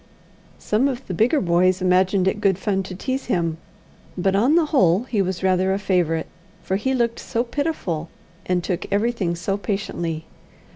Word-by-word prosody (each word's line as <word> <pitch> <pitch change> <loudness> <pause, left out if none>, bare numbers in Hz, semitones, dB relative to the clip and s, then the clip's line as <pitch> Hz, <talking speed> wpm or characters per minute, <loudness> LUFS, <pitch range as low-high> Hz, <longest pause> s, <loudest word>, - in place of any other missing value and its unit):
Some 225 +6 +1
of 260 -1 -4
the 185 - -5
bigger 235 - +3
boys 180 0 +2
imagined 185 +1 +2
it 205 +2 0
good 195 -3 +3
fun 195 0 0
to 185 -1 -7
tease 260 +7 -3
him; 165 -7 -1 0.6
but 190 +2 +1
on 245 +10 +4
the 340 -2 +4
whole 185 - +4
he 230 -5 0
was 185 -1 -2
rather 190 0 +2
a - - -1
favourite, 180 -5 0 0.4
for 190 - -1
he 265 +7 0
looked 235 -2 0
so 235 -1 -1
pitiful, 240 - -3 0.4
and 180 -1 +1
took 180 +1 -3
everything 205 -4 0
so 195 +4 -2
patiently. 175 -6 -3
190 Hz, 175 wpm, -22 LUFS, 180-230 Hz, 0.6 s, on